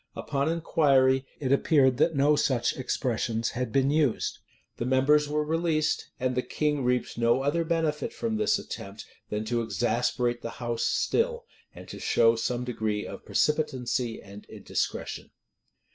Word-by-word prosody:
Upon 140 +2 -1
inquiry, 135 -5 +3
it 135 -3 -2
appeared 140 -3 +4
that 160 +3 +2
no 145 +2 +4
such 125 -4 +1
expressions 120 -3 -1
had 125 -1 -3
been 135 +2 +2
used.[] 150 -6 0 0.4
The 120 - -3
members 140 +3 +3
were 150 +1 0
released; 155 -1 0
and 130 0 0
the 125 - 0
king 150 0 -1
reaped 125 -1 -1
no 120 +3 +3
other 150 +4 +1
benefit 165 +3 -1
from 225 -2 -2
this 215 - +2
attempt 100 +2 -8 0.2
than 105 +1 -3
to 120 +1 0
exasperate 120 +1 0
the 115 - -5
house 120 -1 -2
still, 475 0 0 0.3
and - - -11
to - - -8
show 115 0 +3
some 120 +2 -2
degree 110 -4 -2
of - - -9
precipitancy 130 -6 0
and 100 +1 -12
indiscretion. - - -4
130 Hz, 150 wpm, -27 LUFS, 120-150 Hz, 0.4 s, appeared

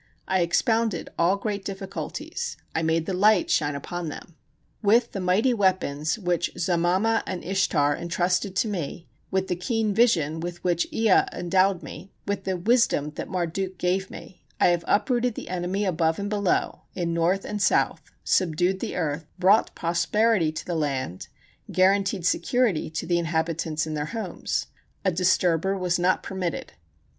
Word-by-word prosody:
I 190 -1 +2
expounded 220 +2 +1
all 175 +3 +4
great 200 -1 -3
difficulties, 195 0 -5 0.2
I 160 - 0
made 160 0 +1
the 190 - -2
light 205 +1 +4
shine 145 -2 +1
upon 170 +3 -5
them. 155 +2 -10 0.5
With 230 +3 +3
the 195 - -4
mighty 195 +8 +2
weapons 185 -6 +1
which 175 -4 -1
Zamama 180 +5 +2
and 185 -2 -4
Ishtar 155 -6 +1
intrusted 180 +3 -1
to 220 - +1
me, 175 -4 -4 0.2
with 190 0 0
the 180 - -1
keen 220 +3 -1
vision 170 -9 +2
with 175 +1 -6
which 175 -1 +1
Ea 220 -4 +4
endowed 185 +1 +1
me, 180 +6 -9 0.2
with 200 -1 -2
the 190 -1 -1
wisdom 190 - +2
that - - -6
Marduk 185 +1 -2
gave 185 +2 0
me, 180 - -12 0.2
I - - +5
have 175 -1 +1
uprooted 245 +2 +1
the - - -7
enemy 185 +3 -1
above 165 -3 +1
and 205 +1 -4
below 200 -3 0
[in 170 -2 -1
north 175 +4 +1
and 210 -1 -4
south], - - +2 0.2
subdued 180 +2 +1
the - - -4
earth, 155 -2 -2
brought 195 +4 +3
prosperity 170 +2 +2
to 155 - -6
the 175 - -3
land, 135 - -2 0.4
guaranteed 190 -1 +2
security 195 -1 +1
to 160 - -4
the 175 0 +1
inhabitants 160 -1 -1
in 155 - -4
their 150 -1 -2
homes; 225 +3 -3 0.4
a 190 - +4
disturber 180 +1 +2
was 180 -1 0
not 180 +1 +2
permitted. 185 -3 -4
180 Hz, 160 wpm, -25 LUFS, 165-195 Hz, 0.5 s, I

